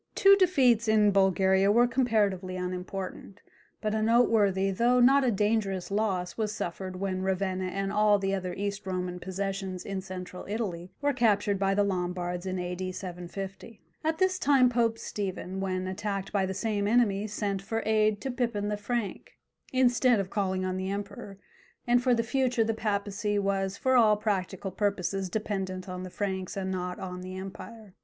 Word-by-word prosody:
Two 395 0 +7
defeats 265 - +3
in 215 -1 +4
Bulgaria 190 0 +3
were 240 +3 +5
comparatively 215 -7 +1
unimportant, 185 +1 -5 0.4
but 215 -1 -1
a 220 - 0
noteworthy 215 -4 +3
though 240 +6 +3
not 270 +3 +6
a 255 - +3
dangerous 205 -3 0
loss 195 -4 -1
was 215 -2 -1
suffered 185 -1 -5
when 185 0 -2
Ravenna 190 0 -1
and 195 +2 -2
all 210 0 +4
the 195 0 -1
other 185 -2 -3
East 200 0 -4
Roman 180 -1 -3
possessions 190 0 -4
in 195 -1 -3
Central 185 -1 -7
Italy 190 -5 -3
were 285 0 +2
captured 205 -5 +2
by 195 0 +2
the 205 - +3
Lombards 180 -1 -2
in 185 0 -2
A.D. 180 +1 -3
750. 190 +4 -7 0.2
At 320 +1 0
this 375 0 +2
time 270 -3 +5
Pope 230 -2 +1
Stephen, 190 -3 -4
when 185 -1 -2
attacked 195 +1 -3
by 195 -2 +1
the 190 - -4
same 205 -2 -1
enemy, 215 -3 +2
sent 200 -2 -2
for 225 +3 -3
aid 215 -1 +2
to 270 - -3
Pipin 235 -5 -1
the 210 - -1
Frank, 215 0 -4 0.4
instead 250 -2 +3
of 195 -1 -3
calling 190 -2 -1
on 185 0 -2
the 190 0 -3
Emperor, 200 0 -6 0.5
and 245 0 +3
for 250 -1 +3
the 230 - +1
future 250 -1 +1
the 225 0 0
papacy 205 -1 -1
was 195 -1 0
for 260 0 +2
all 220 -4 +5
practical 195 -2 -2
purposes 195 -1 -1
dependent 190 -2 -3
on 180 -1 -5
the 185 - -6
Franks 190 -1 -3
and 190 -1 -2
not 180 -1 -3
on 180 -1 -6
the 185 +1 -7
empire. 200 +2 -9
200 Hz, 175 wpm, -28 LUFS, 185-220 Hz, 0.5 s, Two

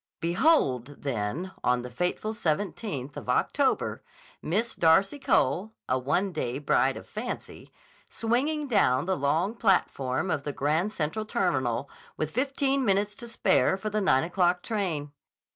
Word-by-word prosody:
Behold, 165 - +2
then, 135 - -2
on 125 0 +2
the 125 - -7
fateful 180 - -2
17th 160 - -2
of - - -8
October, - - +1 0.4
Miss 215 +9 -1
Darcy 190 - +3
Cole, 185 - +1
a 130 - +1
one 180 +10 0
day 125 -6 -2
bride 145 - +2
of - - -9
fancy, - - -6 0.4
swinging 285 +7 0
down 155 - +3
the 190 +1 +1
long 155 +9 +1
platform 180 - +1
of 150 - 0
the 145 0 -4
Grand 155 +10 0
Central 165 +3 -2
Terminal 130 - 0 0.3
with 155 0 -2
fifteen 275 +1 0
minutes 205 -1 +1
to 235 +3 -10
spare 230 -4 +2
for 215 +2 -4
the 215 0 0
nine 160 -8 +3
o'clock 180 +1 +1
train. 170 -10 -2
180 Hz, 145 wpm, -27 LUFS, 140-215 Hz, 0.4 s, Darcy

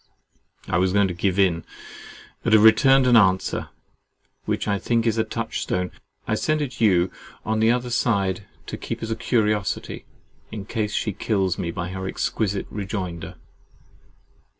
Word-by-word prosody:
I 85 - +1
was 95 0 +2
going 100 -1 +4
to - - -3
give 95 +2 0
in, 90 -4 +2 0.8
but 115 - +1
have 110 -1 +7
returned 135 +4 +6
an 125 -1 +5
answer, 95 -4 +3 0.8
which - - -2
I 100 -1 +1
think 115 +2 0
is 115 -1 +1
a - - +3
touch - - -4
stone. 90 0 -2 0.4
I - - 0
send 155 0 +1
it 130 -5 -4
you 90 -5 +4 0.3
on 110 0 0
the 110 +1 +4
other 125 +1 0
side 100 -4 0 0.2
to - - -6
keep - - -5
as 115 - -3
a - - 0
curiosity, 105 -5 -1 0.5
in 105 -3 -6
case 105 -1 -2
she 105 - -1
kills 95 -3 0
me 85 - -2
by 85 +1 -4
her 95 0 -5
exquisite 100 0 -1
rejoinder. 95 -4 -5
105 Hz, 165 wpm, -23 LUFS, 95-115 Hz, 0.8 s, have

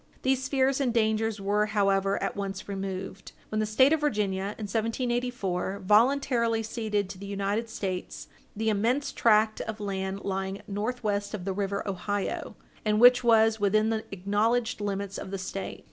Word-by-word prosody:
These 265 0 +1
fears 270 0 +2
and 255 -3 +1
dangers 220 -1 +1
were, 205 +2 +1
however, 195 -2 +2
at - - -2
once 195 -1 -5
removed, 195 -1 -5 0.2
when 215 - -1
the 215 - 0
State 260 +7 +5
of 320 - +2
Virginia, 205 -7 -1
in 215 - -5
1784, 225 -3 -2
voluntarily 235 +1 +3
ceded 215 -3 -2
to 190 -1 -9
the 200 - -7
United 200 +3 -2
States 190 -4 -4 0.3
the 220 +1 0
immense 235 +7 +1
tract 215 -1 +3
of 220 -1 -5
country 195 -2 -3
lying 195 0 -3
northwest 210 -1 -2
of 180 -4 -7
the 195 - -1
river 200 +1 -2
Ohio, 200 +1 -3 0.3
and 215 0 +2
which 250 +1 +7
was 225 -1 +4
within 215 +2 +2
the 220 -1 -1
acknowledged 210 +4 0
limits 200 -1 -3
of - - -7
the 195 - -3
State. 190 +1 -5
210 Hz, 160 wpm, -28 LUFS, 195-230 Hz, 0.3 s, which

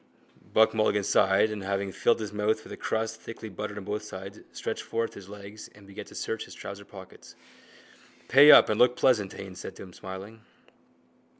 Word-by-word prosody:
Buck 110 0 +5
Mulligan 110 -2 +2
sighed 95 +3 +3
and, 105 -1 -5
having 100 0 -2
filled 115 +5 +2
his 105 -1 -5
mouth 105 +1 0
with - - -10
a - - -5
crust 110 0 -3
thickly 115 -1 -8
buttered 105 +1 -6
on 100 - -6
both 105 +2 -3
sides, 95 -2 -9
stretched - - -4
forth 115 0 -3
his 100 -1 -12
legs 105 +1 -10
and 100 -1 -16
began 100 0 -9
to - - -15
search - - -3
his - - -12
trouser 100 0 -8
pockets. 95 -2 -13 0.9
—Pay 145 +3 +8
up - - +9
and 110 - 0
look 125 0 +5
pleasant, 110 -8 +2
Haines 95 -2 -9
said 95 - -8
to - - -10
him, 90 -2 -13
smiling. 95 +5 -9
105 Hz, 195 wpm, -28 LUFS, 100-110 Hz, 0.9 s, up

